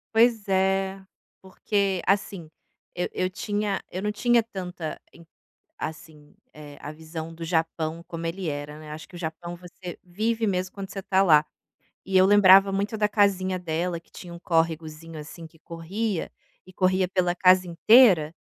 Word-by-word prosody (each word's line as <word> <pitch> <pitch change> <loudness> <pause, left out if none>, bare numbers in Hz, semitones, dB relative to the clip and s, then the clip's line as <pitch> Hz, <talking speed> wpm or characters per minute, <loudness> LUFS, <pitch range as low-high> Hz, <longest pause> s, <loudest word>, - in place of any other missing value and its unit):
Pois 225 -2 +3
é, 190 0 0 0.4
porque, 195 0 -1
assim, 195 -4 0 0.5
eu 180 - -1
eu 185 0 -1
tinha 205 0 -2
eu 185 - -4
não 210 - -1
tinha 240 +2 +3
tanta 180 -7 -6
em 170 - -16 0.6
assim, 155 -1 -8 0.2
eh, 145 -1 -12
a 145 - -8
visão 160 +1 -8
do 165 - -11
Japão 165 0 -2
como 165 0 -6
ele 175 0 -4
era, 145 +1 -6
né. 155 -1 -11
Acho 155 +1 -9
que - - -18
o 175 - -8
Japão 170 +1 -6
você 180 0 -10
vive 220 +5 -1
mesmo 185 -2 -2
quando 195 -1 -7
você 195 - -6
tá 190 0 +2
lá, 155 -5 +6 0.6
e 190 0 -4
eu 185 - +6
lembrava 195 -1 +7
muito 200 +3 -2
da 210 -1 +1
casinha 190 -3 +1
dela 170 0 -2
que - - -30
tinha 175 -2 -11
um 170 - -9
córregozinho, 165 -1 -2
assim, 160 +2 -10
que 160 0 -17
corria, 180 +4 -4 0.3
e 185 - -14
corria 185 0 +2
pela 180 -2 0
casa 185 0 +5
inteira, 175 -3 +5
180 Hz, 170 wpm, -25 LUFS, 165-195 Hz, 0.6 s, lembrava